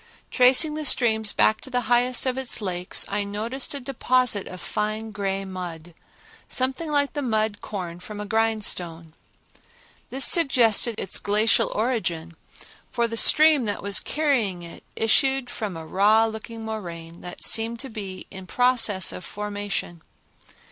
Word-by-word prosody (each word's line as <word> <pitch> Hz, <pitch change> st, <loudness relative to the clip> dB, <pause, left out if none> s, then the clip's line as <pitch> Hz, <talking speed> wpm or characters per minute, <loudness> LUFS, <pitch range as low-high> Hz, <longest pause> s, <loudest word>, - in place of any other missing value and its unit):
Tracing 255 Hz, +5 st, +5 dB
the 310 Hz, 0 st, -4 dB
streams 220 Hz, -6 st, +3 dB
back 215 Hz, -, +2 dB
to -, -, -8 dB
the 250 Hz, -1 st, -1 dB
highest 245 Hz, +2 st, +1 dB
of 255 Hz, -1 st, 0 dB
its 265 Hz, -2 st, -1 dB
little 190 Hz, -4 st, -3 dB
lakes, 180 Hz, +1 st, 0 dB
I 205 Hz, +1 st, -1 dB
noticed 225 Hz, +8 st, -3 dB
a -, -, -3 dB
deposit 255 Hz, -4 st, 0 dB
of 180 Hz, -, -9 dB
fine 215 Hz, +3 st, -3 dB
gray 195 Hz, -2 st, -3 dB
mud, 175 Hz, -3 st, -8 dB, 0.5 s
something 260 Hz, +5 st, -2 dB
like 285 Hz, -1 st, +1 dB
the 290 Hz, -, -3 dB
mud 220 Hz, -4 st, -1 dB
corn 175 Hz, -4 st, -6 dB
from 205 Hz, +3 st, -9 dB
a 210 Hz, -, -5 dB
grindstone. 200 Hz, -7 st, -1 dB, 1.0 s
This 265 Hz, +1 st, +1 dB
suggested 240 Hz, -, +4 dB
its 190 Hz, -, -3 dB
glacial 210 Hz, +2 st, +2 dB
origin, 175 Hz, -8 st, -2 dB, 0.6 s
for 235 Hz, -2 st, 0 dB
the 230 Hz, -, -5 dB
stream 305 Hz, +2 st, +5 dB
that 205 Hz, -1 st, -4 dB
was 200 Hz, 0 st, +1 dB
carrying 245 Hz, -, -1 dB
it 170 Hz, -, -11 dB
issued 265 Hz, +3 st, +1 dB
from 205 Hz, -7 st, -5 dB
a 160 Hz, -, -8 dB
raw 210 Hz, +6 st, +3 dB
looking 225 Hz, 0 st, -7 dB
moraine 170 Hz, -6 st, -7 dB
that 180 Hz, -, -7 dB
seemed 225 Hz, +1 st, +2 dB
to 270 Hz, -, -7 dB
be 195 Hz, -4 st, -7 dB
in 190 Hz, -1 st, -10 dB
process 240 Hz, -6 st, +2 dB
of -, -, -8 dB
formation. 205 Hz, -4 st, -5 dB
220 Hz, 155 wpm, -24 LUFS, 195-250 Hz, 1.0 s, Tracing